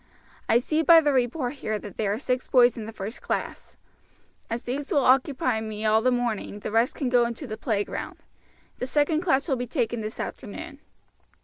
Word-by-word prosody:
I 230 - +6
see 310 +6 0
by 330 +1 +8
the 295 -3 +2
report 255 +2 0
here 215 0 -1
that 205 -2 -10
there 210 -2 0
are 205 - -1
six 250 0 -2
boys 245 -2 +5
in 225 - -6
the 225 - -7
first 215 +2 -6
class. - - -4 0.7
As 230 +1 -3
these 275 +4 -4
will 280 -3 +3
occupy 255 -3 +2
me 215 0 -5
all 220 +1 +4
the 255 - +3
morning 235 -4 -2
the - - -4
rest 230 +3 +2
can 275 - -2
go 245 -1 +4
into 235 +5 -6
the 215 -4 -5
playground. 210 -4 -3 0.6
The 250 - -2
second 295 +3 +1
class 320 -5 +1
will 270 -5 +1
be 245 0 -4
taken 240 -3 -1
this 215 +1 -6
afternoon." 280 +6 -7
245 Hz, 200 wpm, -26 LUFS, 220-275 Hz, 0.7 s, by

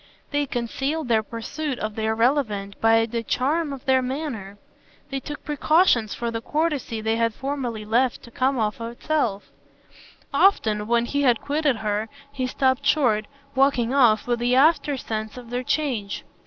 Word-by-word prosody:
They 290 -1 0
concealed 270 +5 -2
their 225 -2 +4
pursuit 255 +6 -5
of 215 -2 -3
the 220 +1 -3
irrelevant 220 -3 0
by 225 0 +5
the 230 0 -3
charm 290 +7 0
of 275 0 -8
their 260 -1 +4
manner; 250 -7 -4 0.5
they 270 - -1
took 295 +3 -8
precautions 295 - +3
for 235 -1 -3
the 225 0 -3
courtesy 295 -5 -1
they 220 +1 0
had 230 -1 +1
formerly 260 -6 -4
left 240 +4 +1
to 235 - -13
come 260 +3 +1
of 215 0 -1
itself; 235 -2 -2 0.8
often, 215 - +3
when 235 0 +2
he 285 +4 -1
had 245 -5 +3
quitted 290 -2 0
her, 215 0 -2 0.2
he 260 -2 -2
stopped 260 +1 +1
short, 250 -8 +2 0.3
walking 265 -3 +2
off, 235 -6 +4
with 240 -1 0
the 245 +1 +2
aftersense 265 -7 +1
of 240 -2 -10
their 245 +1 -1
change. 255 -7 -2
245 Hz, 160 wpm, -24 LUFS, 225-280 Hz, 0.8 s, by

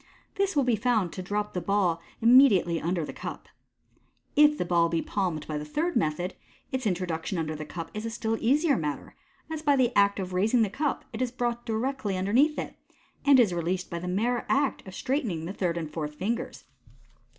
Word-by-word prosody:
This 395 -2 0
will 285 - +4
be 245 -2 +2
found 215 -5 +1
to 185 - -5
rop 205 +3 -2
the 180 - -2
ball 180 -2 +1 0.2
imm 235 +2 +7
• 275 - +7
diately 175 -5 0
under 170 -1 0
the - - -7
cup. - - -7 0.9
If 300 0 +6
the - - -1
ball 170 -1 +3
be 165 - 0
palmed 175 -5 -2
by 150 -1 -3
the - - -5
third 320 - -2
method, 170 +4 0 0.4
its 260 -3 -1
introduction 180 -1 -2
under 155 -1 -2
the 155 0 -7
cup 165 0 -6
is 215 - -5
a 230 - -3
still 225 0 -2
easier 285 +5 +3
matter, 150 -6 -4 0.4
as 315 -1 -3
by 290 -2 +3
the 250 -2 +2
act 200 0 +4
of 185 -1 -4
raising 220 +6 +3
the 205 - -1
cup 295 +4 -2
it 225 - -4
is 250 -2 0
brought 240 -1 -2
directly 225 -3 -1
underneath 245 +12 +2
it, - - -5 0.5
and 280 -2 +7
is 215 -7 +4
released 175 +2 -2
by 170 - -3
the 180 - -6
mere 230 +7 0
act 280 0 +1
of 190 - -9
straightening 225 - -2
the 185 - -5
third 175 -4 -1
and 160 -3 -4
fourth 150 -2 -5
ringers. 225 +5 -3
200 Hz, 210 wpm, -27 LUFS, 170-250 Hz, 0.9 s, imm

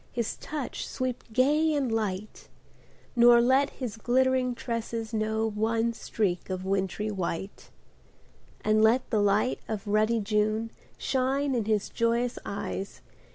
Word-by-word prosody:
His 235 -2 -2
touch 300 -5 -5
sweep 255 -1 -3
gay 295 +6 +3
and 270 -5 0
light; 215 -2 -3 0.7
Nor 240 0 +7
let 260 +4 +4
his 240 -5 -6
glittering 255 +1 +2
tresses 230 -2 -4
know 220 0 0
One 225 +2 0
streak 200 -5 -2
of 185 0 -3
wintry 195 +2 -1
white. 190 0 -4 0.9
And 215 0 +3
let 230 +4 +4
the 215 -3 +3
light 205 +5 +2
of 220 -1 -4
ruddy 215 +2 +2
June 215 +2 0 0.3
Shine 270 +1 0
in 235 -4 0
his 215 -2 +1
joyous 235 +1 0
eyes. 200 0 -5
225 Hz, 130 wpm, -28 LUFS, 210-250 Hz, 0.9 s, Nor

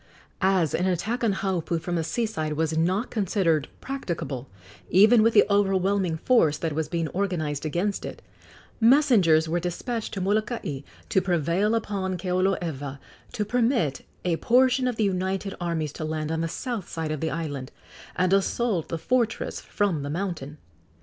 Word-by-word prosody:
As 185 -5 +2
an 180 - +1
attack 215 +7 -1
on 225 - +3
Haupu 185 -3 -1
from 175 +2 -4
the 165 -2 0
sea 230 +8 -1
side 155 -8 -3
was 160 +1 0
not 185 +8 0
considered 185 - +1
practicable, 165 - -4 0.4
even 215 +5 +6
with 225 +1 +3
the - - +7
overwhelming 195 -3 +2
force 160 - +3
that 160 -1 -2
was 155 0 -2
being 165 -2 -1
organized 160 -6 -2
against 180 +6 -1
it, - - -7 0.6
messengers 225 - +5
were 170 +2 0
despatched 210 +7 -3
to - - -2
Molokai 210 - -1 0.3
to 195 -4 +3
prevail 180 +4 +1
upon 195 -4 -2
Keoloewa 175 -6 -1 0.4
to 210 - -1
permit 230 - +1 0.2
a 170 -2 +1
portion 255 +3 +3
of 250 - -1
the 220 - 0
united 190 0 -1
armies 160 -4 -2
to - - -6
land 155 0 -2
on 160 0 -1
the 165 - 0
south 230 +2 -4
side 160 -2 -3
of 155 - -2
the 160 - -1
island 145 -5 -4 0.4
and 185 +1 +2
assault 195 -2 +1
the 165 - -2
fortress 230 +7 0
from 195 -8 -1
the 140 - -4
mountain. 160 -4 -4
185 Hz, 165 wpm, -26 LUFS, 160-210 Hz, 0.6 s, the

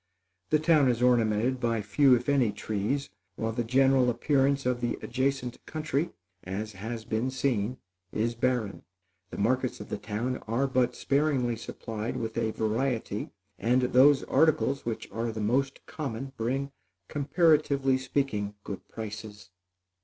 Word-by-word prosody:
The 155 - +4
town 155 -3 +4
is 120 0 +1
ornamented 120 +1 +3
by 115 -3 0
few, 125 +6 +5
if 120 0 -3
any, 135 -6 +3
trees, 105 +6 -2 0.2
while 110 +2 -2
the 120 +2 -1
general 130 +1 +4
appearance 135 +2 +2
of 125 -1 0
the 120 - -1
adjacent 130 -1 -2
country, 155 +1 -1 0.3
as 100 +4 -4
has 110 +3 -6
been 110 +4 -1
seen, 130 -3 -1 0.3
is 115 +2 0
barren. 115 -4 -1 0.5
The - - -8
markets 125 +4 0
of 105 - -9
the - - -3
town 115 +5 -2
are 115 +5 +1
but 125 -2 +1
sparingly 140 -4 +1
supplied 110 0 -5
with 110 -1 -4
a 115 -1 0
variety, 110 0 -1 0.3
and 125 +2 +2
those 135 +3 +5
articles 140 -3 +2
which 115 - -3
are 115 +1 -2
the 110 - -6
most 130 +6 0
common, 135 -3 -5
bring, 135 +4 -2 0.4
comparatively 145 -3 +2
speaking, 130 -6 -1
good 100 - -7
prices. 105 -2 -8
125 Hz, 145 wpm, -28 LUFS, 110-135 Hz, 0.5 s, few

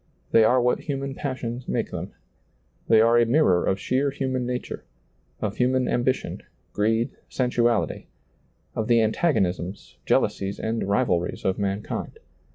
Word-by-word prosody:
They 115 - +6
are 125 +4 +4
what 125 0 +2
human 140 -2 -4
passions 130 -3 -4
make - - -1
them. - - -5 0.8
They 110 - +6
are 115 +1 +5
a 120 - +4
mirror 115 - +3
of 95 - +1
sheer 135 +6 +1
human 130 -2 -2
nature; 125 0 -4 0.6
of 105 -1 -2
human 125 0 +2
ambition, 130 +2 -1 0.3
greed, 115 +4 +1 0.2
sen 125 -2 -1
suality; 120 -3 +1 0.7
of 110 - -2
the 120 -1 +4
antagonisms, 100 - 0
jealousies, 100 0 +1
and 115 +1 -2
rivalries 90 -5 0
of 95 +1 0
mankind. 100 +1 -3
120 Hz, 140 wpm, -25 LUFS, 105-130 Hz, 0.8 s, They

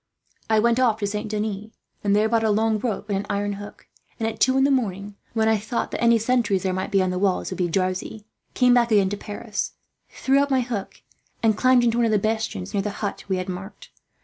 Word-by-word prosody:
I 220 - +4
went 235 +3 +3
off 235 -4 +3
to - - +1
Saint 210 +2 -3
Denis, 210 -1 -3 0.4
and 200 -1 +2
there 215 +1 +3
bought 225 0 +1
a 220 - +2
long 220 +1 +2
rope 220 -2 -3
and 195 -1 0
an 200 - -6
iron 205 0 -1
hook; 205 - -11 0.3
and 225 - 0
at 225 -1 -5
two 260 +1 +3
in 265 - +4
the 280 - +3
morning, 205 -6 -1 0.2
when 220 -1 +1
I 220 -1 +3
thought 220 +3 -3
that - - -4
any 235 0 +5
sentries 225 -4 +1
there 190 -1 0
might 185 +1 -3
be 195 -3 +3
on 185 - 0
the 180 - -2
walls 190 -1 0
would 185 - -5
be 180 - +2
drowsy, 185 +4 -2 0.3
came 250 -1 +5
back 235 -1 +3
again 200 -3 +4
to 205 - -3
Paris, 205 +1 -5 0.4
threw 275 +1 +2
up 285 - 0
my 265 -2 +2
hook, 230 -5 -5 0.4
and 220 -2 +4
climbed 255 +2 +4
into 235 0 +2
one 235 - +3
of - - 0
the 215 - +4
bastions 215 -2 -2
near 200 - +1
the 210 - -2
hut 205 0 -5
we 190 -2 0
had 185 +1 -4
marked. 195 - -8
215 Hz, 250 wpm, -23 LUFS, 200-230 Hz, 0.4 s, any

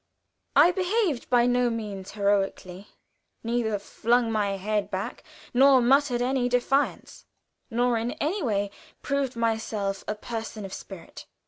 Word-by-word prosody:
I 350 - +7
behaved 365 - 0
by 240 -1 +4
no 245 0 +2
means 210 -4 -5
heroically; 200 -2 -1 0.6
neither 230 -2 0
flung 230 +4 0
my 205 -2 0
head 210 +1 -1
back, - - -4 0.3
nor 265 +1 +6
muttered 250 0 +3
any 255 -1 +1
defiance, 250 +3 -1 0.4
nor 240 0 +1
in 235 +2 -2
any 360 +8 -2
way 205 -6 -1 0.3
proved 280 -3 -1
myself 220 -4 -1
a 210 - -2
person 220 -1 -6
of 190 - -8
spirit. 190 -4 -10
235 Hz, 130 wpm, -26 LUFS, 205-250 Hz, 0.6 s, I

